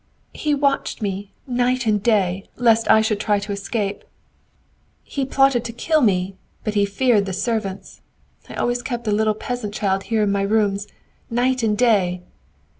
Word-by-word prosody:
"He 300 -1 0
watched 280 -4 0
me, 200 0 -3
night 250 0 0
and 210 -2 +2
day, 195 -4 +1
lest 230 -2 +3
I 220 0 +7
should 215 -1 0
try 210 -1 +1
to 205 +1 -5
escape! 200 0 -3 1.0
He 275 -2 -3
plotted 270 -3 +3
to 235 - -4
kill 310 +6 +1
me, 190 -4 +1 0.3
but 215 - -2
he 205 -1 +2
feared 205 -1 +2
the 190 - -3
servants. 200 -1 -3 0.5
I - - -8
always 245 0 0
kept 240 -2 -5
a - - +2
little 215 +1 +2
peasant 215 -2 -5
child 195 -2 0
here 225 -2 +1
in 205 - +1
my 200 0 +1
rooms, 200 -1 +1 0.4
night 250 +2 +1
and 215 -2 +1
day. 190 -7 +2
215 Hz, 170 wpm, -21 LUFS, 200-245 Hz, 1.0 s, I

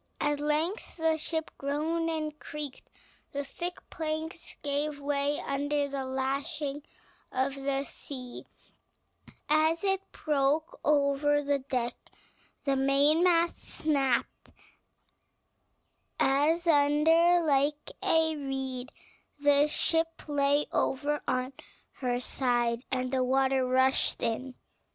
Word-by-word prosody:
At 295 0 0
length 305 +9 -1
the 320 -1 +2
ship 320 +1 -3
groaned 315 +4 -1
and 310 -2 -3
creaked; 295 -3 -8 0.4
the 285 0 -2
thick 350 +5 -6
planks 320 +1 -4
gave 290 0 -1
way 285 0 0
under 285 +1 -1
the 275 -1 -3
lashing 275 +3 -2 0.5
of 265 +1 0
the 275 0 -1
sea 255 -3 -8 1.0
as 315 +3 +3
it 385 -1 0
broke 300 +1 0
over 290 0 +3
the 285 0 +1
deck; 250 -3 -2 0.7
the 275 -1 +1
mainmast 310 +6 +3
snapped 275 -5 -1 1.7
asunder 320 +3 +4
like 290 0 +1
a 320 -1 +3
reed; 265 -2 -4 0.5
the 290 0 +4
ship 325 +2 0
lay 285 0 +2
over 290 +2 0
on 255 +1 -1 0.4
her 245 -2 -1
side; 240 -2 0
and 255 -1 -1
the 260 -1 +2
water 265 0 +2
rushed 260 +1 +2
in. 245 +3 -2
285 Hz, 105 wpm, -29 LUFS, 270-310 Hz, 1.7 s, asunder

